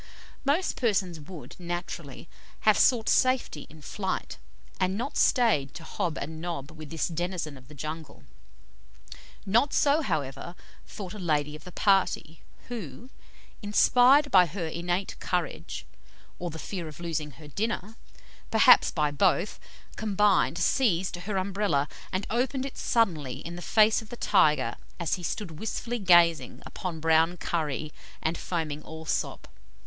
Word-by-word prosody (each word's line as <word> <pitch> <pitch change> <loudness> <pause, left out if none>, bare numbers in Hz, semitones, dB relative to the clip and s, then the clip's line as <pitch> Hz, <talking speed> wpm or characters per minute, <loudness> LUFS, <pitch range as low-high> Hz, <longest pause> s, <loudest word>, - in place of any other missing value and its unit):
Most 310 +7 +1
persons 190 -8 0
would, 160 +2 -10
naturally, 175 -4 -6 0.3
have 215 -1 +5
sought 230 0 +4
safety 255 - +2
in 155 0 -15
flight, 190 +2 -4 0.4
and 185 +1 +1
not 245 +5 -4
stayed 210 - +3
to 165 - -8
hob 165 0 -3
and 160 +2 -6
nob 165 -5 -5
with 155 -2 -10
this 165 -1 -1
denizen 175 -2 -3
of 130 -1 -15
the 150 - -13
jungle; 155 +2 -7 1.2
not 235 +8 +3
so, 295 +2 +3
however, 145 - -3 0.3
thought 190 -3 -7
a 210 - -8
lady 150 -4 0
of 155 - -12
the 180 - -9
party, 190 -5 +1 0.3
who, 235 - -7 0.5
inspired 250 +7 +5
by 180 -2 +7
her 170 +1 -4
innate 175 +4 -2
courage, 170 - -3 0.5
or 175 - -3
the 160 - -7
fear 175 0 -5
of 155 0 -10
losing 160 -4 -3
her 150 +5 -13
dinner 215 - -3 0.5
perhaps - - +7
by 150 -3 0
both 180 +5 +1 0.4
combined 205 -5 +2
seized 185 -3 +2
her 190 +3 -4
Umbrella, 190 -7 0 0.2
and 190 +2 -1
opened 260 +3 0
it 275 - -7
suddenly 160 - +1
in 170 +1 -5
the 175 - -7
face 215 +4 +4
of 220 - -14
the 240 - -8
tiger 180 -10 +3 0.2
as 170 -3 -1
he 185 - -1
stood 170 -2 -4
wistfully 235 +2 -3
gazing 175 -4 +4
upon 175 -4 -5
brown 160 +2 +3
curry 155 -3 -2 0.3
and 160 +1 -1
foaming 160 -4 -3
Allsop. 160 +1 -4
175 Hz, 145 wpm, -28 LUFS, 155-210 Hz, 1.2 s, by